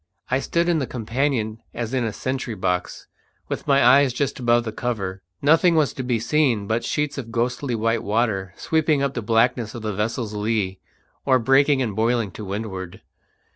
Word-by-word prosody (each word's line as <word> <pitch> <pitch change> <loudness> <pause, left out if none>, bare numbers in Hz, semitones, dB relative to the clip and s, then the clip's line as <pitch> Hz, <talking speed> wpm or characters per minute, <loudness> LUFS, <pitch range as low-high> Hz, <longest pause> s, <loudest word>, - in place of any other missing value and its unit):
I 130 - +3
stood 170 +4 0
in 170 -2 +2
the 135 - -2
companion 115 -2 -1
as 115 +1 -4
in 130 -2 +1
a 110 - -1
sentry 130 -1 -3
box, 90 -2 -2 0.4
with - - -4
my 140 -2 +4
eyes 135 +1 +6
just 135 +1 -2
above 120 -1 +3
the 110 - -4
cover. 100 -5 -3 0.2
Nothing 165 +4 +5
was 155 -3 +2
to - - -5
be 125 -2 0
seen 120 -3 +1
but 110 +3 -1
sheets 150 +3 -1
of 115 -3 -7
ghostly 120 +2 -1
white 115 0 0
water 105 -3 0
sweeping 155 -3 +1
up 140 -1 0
the 120 - -3
blackness 115 +1 +1
on 115 - -7
the 105 -1 -2
vessel's 110 +2 -2
lee, 105 -3 -1 0.4
or 130 -2 +4
breaking 135 +3 +3
and 110 -5 -3
boiling 115 -2 +1
to 105 - -8
windward. 95 -2 -5
120 Hz, 185 wpm, -23 LUFS, 110-135 Hz, 0.4 s, eyes